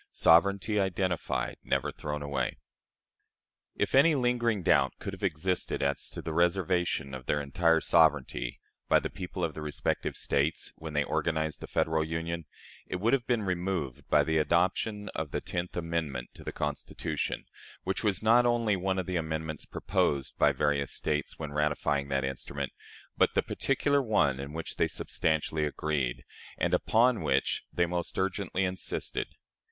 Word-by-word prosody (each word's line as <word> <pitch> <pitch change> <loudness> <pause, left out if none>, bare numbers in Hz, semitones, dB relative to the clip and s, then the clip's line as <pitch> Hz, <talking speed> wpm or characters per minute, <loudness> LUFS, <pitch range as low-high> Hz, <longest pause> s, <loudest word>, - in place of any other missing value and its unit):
Sovereignty 100 +5 +4
identified. 90 -9 -1
Never - - 0
thrown 75 -1 -4
away. 70 -1 -2 1.2
If - - -1
any 150 +4 +6
lingering 120 -5 +1
doubt - - +4
could 100 - -6
have 95 - -9
existed 90 -2 -1
as 70 0 0
to - - -7
the 80 - -3
reservation 90 -4 +1
of 65 -2 -7
their 75 - +2
entire 80 +3 +2
sovereignty 75 -7 +2 0.3
by - - +6
the - - -4
people 90 0 -5
of 80 -2 0
the 75 - -7
respective 75 -1 -1
States, 70 +3 0
when 80 -1 -7
they 75 0 +2
organized 80 0 -1
the - - -6
Federal 80 0 +1
Union, 80 +1 -3 0.4
it - - -3
would 110 +7 +1
have 130 -4 +1
been 120 -3 +1
removed 90 -7 -2
by - - +5
the 80 -1 +1
adoption 95 +6 +1
of 80 -2 -4
the - - -2
tenth 85 +1 -4
amendment 80 -7 -2
to - - -12
the - - -4
Constitution, 75 -1 -3 0.4
which 95 +4 -2
was 105 -1 +1
not 115 +3 +6
only 120 -3 +2
one 95 +1 -1
of 95 - -1
the 90 0 -1
amendments 80 -1 -3
proposed 70 -2 0
by - - +6
various 70 -2 0
States 75 -1 -2
when 75 -2 -5
ratifying 75 -1 0
that 70 -1 0
instrument, 65 -1 -4 0.4
but - - +3
the - - +3
particular 140 +1 +1
one 75 - +2
in 70 +1 -5
which 80 +1 -5
they - - +3
substantially 80 0 0
agreed, 75 -4 -1 0.3
and - - 0
upon 120 +1 +3
which 65 +1 +1
they 85 - +2
most 85 0 -3
urgently 95 0 0
insisted. 95 0 -2
85 Hz, 160 wpm, -30 LUFS, 75-95 Hz, 1.2 s, any